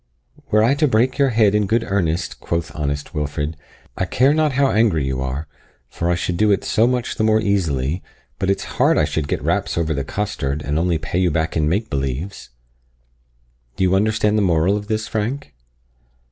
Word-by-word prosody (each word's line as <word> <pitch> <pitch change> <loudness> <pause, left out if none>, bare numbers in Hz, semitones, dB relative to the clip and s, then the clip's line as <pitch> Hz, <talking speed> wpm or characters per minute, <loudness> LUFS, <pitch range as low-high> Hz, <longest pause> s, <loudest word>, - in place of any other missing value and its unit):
'Were 110 0 +4
I 120 +5 +4
to 150 +2 +2
break 125 +2 +1
your 140 -1 +4
head 110 -4 +3
in 105 -1 +2
good 115 +3 +1
earnest,' 90 -3 -1
quoth 85 -1 -3
honest 70 -1 -3
Wilfred, 75 0 -3 0.4
'I 95 - 0
care 130 - +3
not 155 -2 +2
how 135 0 +2
angry 100 -10 +2
you 65 -1 -2
are, 65 +4 -3 0.4
for 85 - -2
I 90 - +3
should 90 0 -2
do 110 +3 +3
it 100 - +1
so 115 +1 +2
much 125 -1 -1
the - - +1
more 110 0 +4
easily 85 -7 0 0.4
but 95 0 0
it's 100 - 0 0.2
hard - - +4
I 75 - +3
should 75 0 -2
get - - -2
raps - - -1
over 80 -1 0
the 70 -1 -2
costard, 75 -5 -3
and 75 +3 -1
only 85 -1 +1
pay 80 +3 -3
you 90 -1 +3
back 80 0 -1
in 75 -2 +1
make 105 +7 -1
believes' 70 +8 -4 1.3
Do 95 - -1
you 95 0 +3
understand 105 +1 +2
the - - +2
moral 90 +1 +2
of 105 0 -4
this, 110 0 -2
Frank?" 110 - -3
95 Hz, 200 wpm, -20 LUFS, 75-110 Hz, 1.3 s, Were